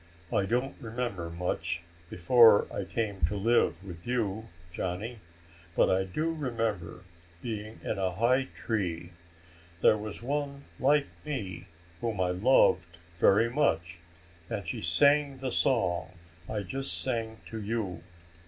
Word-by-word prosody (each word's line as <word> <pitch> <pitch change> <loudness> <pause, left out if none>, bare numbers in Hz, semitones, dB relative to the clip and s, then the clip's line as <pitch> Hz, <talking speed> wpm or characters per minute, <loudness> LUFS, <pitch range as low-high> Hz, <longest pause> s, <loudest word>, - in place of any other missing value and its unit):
I 95 - +2
don't 125 +5 0
remember 115 -7 -3
much 85 0 -2 0.3
before 115 +3 +6
I 100 - -3
came 100 -4 -3
to 100 +5 -2
live 100 -5 +2
with 85 -2 -10
you, 110 -3 -1 0.2
Johnny. 100 +7 -4 0.6
But - - +4
I 95 0 +2
do 155 - -1
remember 115 - -3 0.4
being 110 -1 -5
in - - -2
a 95 -1 +1
high 125 +6 +3
tree. 90 -6 -2 0.7
There 105 - +5
was 105 +2 -5
one 140 +1 -2 0.2
like 145 +2 +4 0.2
me 105 - -5 0.3
whom 110 -2 -2
I 90 -1 +2
loved 90 -4 +3 0.2
very 115 +6 +5
much, 85 - 0 0.5
and 100 -5 -4
she - - -3
sang 140 - +4
the 130 -1 -3
song 110 -11 +1 0.4
I 105 -2 -2
just 135 +8 -2
sang 115 -3 -2
to 110 -1 -4
you. 105 -3 -3
110 Hz, 135 wpm, -29 LUFS, 95-125 Hz, 0.7 s, before